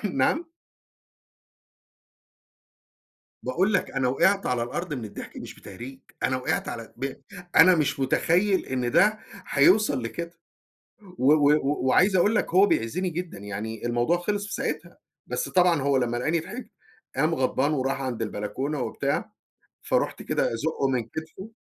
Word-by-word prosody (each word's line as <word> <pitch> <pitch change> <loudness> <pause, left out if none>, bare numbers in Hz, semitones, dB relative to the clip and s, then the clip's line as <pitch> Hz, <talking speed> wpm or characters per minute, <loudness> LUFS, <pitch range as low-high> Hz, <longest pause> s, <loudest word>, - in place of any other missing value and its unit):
نعم؟ 210 - 0 2.9
باقول 185 +11 +1
لك - - 0
أنا 135 -2 0
وقعت 195 +10 +2
على 125 -2 0
الأرض 165 +6 -4
من 125 -5 -4
الضحك 105 - -9
مش - - -8
بتهريج 130 +3 -10 0.2
أنا 130 - +1
وقعت 130 - -1
على 115 -1 -7
ب 135 +2 -3 0.4
أنا 180 +2 +8
مش 150 -3 0
متخيل 180 +8 +2
إن 125 -2 -2
ده 215 - +4 0.3
هيوصل 145 - +4
لكده 170 +8 -5 0.9
و 135 +4 +5
و 145 -1 +3
وعايز 190 +8 +4
أقول 205 +5 +3
لك - - 0
هو 190 +3 +7
بيعزني 180 - 0
جدًا 170 - -5
يعني 105 +3 -6
الموضوع 120 +8 +1
خلص 205 +3 -2
في - - -6
ساعتها - - -4 0.3
بس - - -2
طبعًا 175 -5 +3
هو 140 0 +2
لمّا 120 -2 0
لقاني 155 +7 0
ضحكت 215 +8 -8 0.5
قام 155 +4 +2
غضبان 135 +2 +1
وراح 135 0 -1
عند 125 -4 -3
البلكونة 110 +8 -3
وبتاع، - - -2 0.5
فرُحت - - 0
كده - - 0
أزقه 140 +1 -1
من 125 -3 0
كتفه. 175 - -8
145 Hz, 145 wpm, -26 LUFS, 125-180 Hz, 2.9 s, أنا